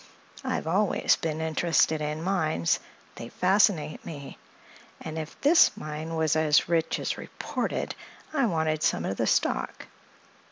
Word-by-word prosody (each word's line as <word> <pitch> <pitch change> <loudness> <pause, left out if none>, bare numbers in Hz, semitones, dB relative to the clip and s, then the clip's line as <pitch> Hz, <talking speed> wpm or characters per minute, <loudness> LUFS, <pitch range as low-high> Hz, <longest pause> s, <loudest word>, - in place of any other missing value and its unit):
I've - - -2
always 190 +5 +2
been 160 -1 -3
interested 160 -1 +1
in 150 +1 -3
mines; 160 - +1 0.4
they 115 - -7
fascinate 185 -4 +2
me; 140 -4 -9 0.6
and 160 0 -6
if 155 0 -8
this 295 -6 +5
mine 155 -2 -5
was 160 -1 +1
as 155 -1 +3
rich 165 -1 +1
as - - -3
reported - - -3 0.4
I 275 -5 +2
wanted 160 -4 0
some - - +1
of 95 - -3
the - - 0
stock. - - 0
160 Hz, 135 wpm, -27 LUFS, 155-175 Hz, 0.6 s, this